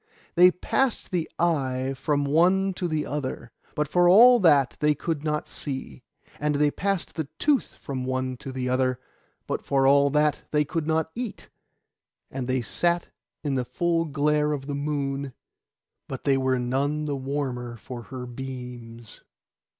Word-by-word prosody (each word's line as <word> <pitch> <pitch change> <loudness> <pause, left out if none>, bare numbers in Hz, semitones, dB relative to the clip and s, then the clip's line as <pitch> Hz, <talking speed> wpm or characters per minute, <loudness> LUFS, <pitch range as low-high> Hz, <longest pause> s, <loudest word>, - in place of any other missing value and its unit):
They 180 +1 +7
passed 240 +7 -1
the 175 -3 -1
eye 135 -6 0
from 145 +1 0
one 185 +6 +3
to 180 0 -3
the 155 -2 -1
other, 130 -4 -4 0.2
but 150 0 0
for 175 +3 +4
all 240 +6 +8
that 145 - +4
they 150 0 +3
could 155 0 -3
not 150 -1 -1
see; 135 -2 -6 0.4
and 150 0 0
they 145 0 +3
passed 195 +1 -2
the 160 - -3
tooth 290 -3 +1
from 130 -2 -5
one 130 0 -2
to 135 - -7
the 130 -1 -3
other, 130 0 +1 0.5
but - - -3
for 135 -1 +2
all 140 +1 +5
that 150 +1 +2
they 150 -1 +2
could 160 +1 -3
not 160 0 0
eat; 235 -3 -6 0.8
and 130 -2 -4
they 130 -1 0
sat 170 - 0 0.3
in 145 -3 -1
the 130 -1 0
full 165 +5 0
glare 150 0 +1
of 135 -2 -4
the 145 - -4
moon, 140 -2 -2 0.7
but - - -6
they 140 - +3
were 130 -1 +1
none 140 +5 -1
the 145 -1 -1
warmer 130 -3 -3
for 125 +1 -8
her 125 +1 -7
beams. 120 -2 -8
145 Hz, 165 wpm, -26 LUFS, 130-160 Hz, 0.8 s, all